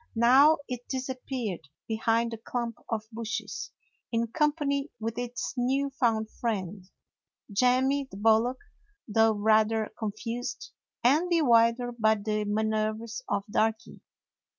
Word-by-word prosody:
Now 265 +7 +6
it 245 -2 -6
disappeared 255 - -4 0.2
behind 225 +1 +1
the 230 - -6
clump 235 0 -4
of 220 -1 -3
bushes, 225 0 -4 0.4
in 230 -1 0
company 295 0 0
with 225 +1 -3
its 245 0 -4
new 270 +3 0
found 225 -5 0
friend, 195 -4 -4 0.6
Jemmy 255 +5 +2
the 195 - -10
bullock, 225 +4 +3 0.5
though 225 0 +4
rather 220 +1 +2
confused 235 +6 -4 0.3
and 300 +9 +4
bewildered 245 -6 +3
by 220 0 +4
the 210 0 -2
manoeuvers 220 +2 -1
of 200 - 0
Darky. 220 +2 -1
230 Hz, 115 wpm, -28 LUFS, 220-255 Hz, 0.6 s, Now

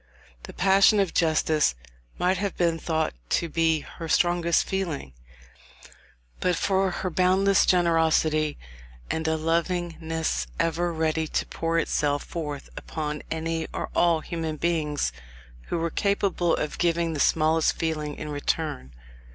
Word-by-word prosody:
The - - -10
passion 195 +3 +5
of 195 -3 +1
justice 155 - +2 0.4
might 185 +1 +1
have 200 -2 -3
been 170 -2 +1
thought 160 -1 -1 0.2
to 170 - -2
be 160 -1 +1
her 165 +2 -9
strongest 175 -1 +3
feeling, 170 - -3 1.3
but 180 -1 +1
for 190 +2 +1
her 185 0 -3
boundless 190 +3 +3
generosity, 160 -3 +2 0.5
and 160 0 -2
a 160 0 +1
lovingness 165 - -1
ever 170 +1 0
ready 160 -1 0
to - - -1
pour 165 0 -2
itself 145 -3 0
forth 150 -4 -5
upon 150 -1 -4
any 160 0 -2
or - - -4
all 170 -2 +3
human 160 -1 -4
beings 150 - 0 0.6
who - - -2
were 165 0 -1
capable 195 -3 +1
of 150 - -4
giving 170 -1 +1
the 150 - -4
smallest 160 +2 +3
feeling 155 -2 -3
in 155 - -6
return. 145 - -2
165 Hz, 135 wpm, -26 LUFS, 155-175 Hz, 1.3 s, passion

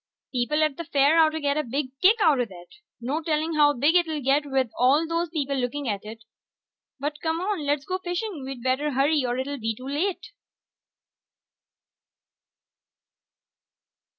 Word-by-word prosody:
People 285 +5 +1
at 305 -3 0
the 335 - -4
fair 290 +1 +3
oughtta 315 0 +3
get 285 -1 0
a 305 - +1
big 265 +1 -3
kick 390 +4 +6
outta 270 -7 +3
that. 175 -3 -13 0.3
No 275 +7 -2
telling 315 0 -1
how 295 -1 +5
big 290 +6 +3
it'll 330 -4 +2
get 285 +2 +1
with 265 -4 0
all 275 +6 +3
those 335 +1 -1
people 285 -4 -2
looking 265 +2 -2
at 205 -3 -2
it. 225 +1 -10 0.8
But 295 +2 -4
come 320 0 -1
on, 370 -5 -2
let's 290 0 0
go 370 +2 -2
fishing. 355 -3 -4
We'd 260 -2 -7
better 265 +3 0
hurry 280 +2 +2
or 245 0 -1
it'll 280 +2 -3
be 225 -1 -2
too 255 +4 -10
late. 335 +7 -2
290 Hz, 160 wpm, -25 LUFS, 260-320 Hz, 0.8 s, kick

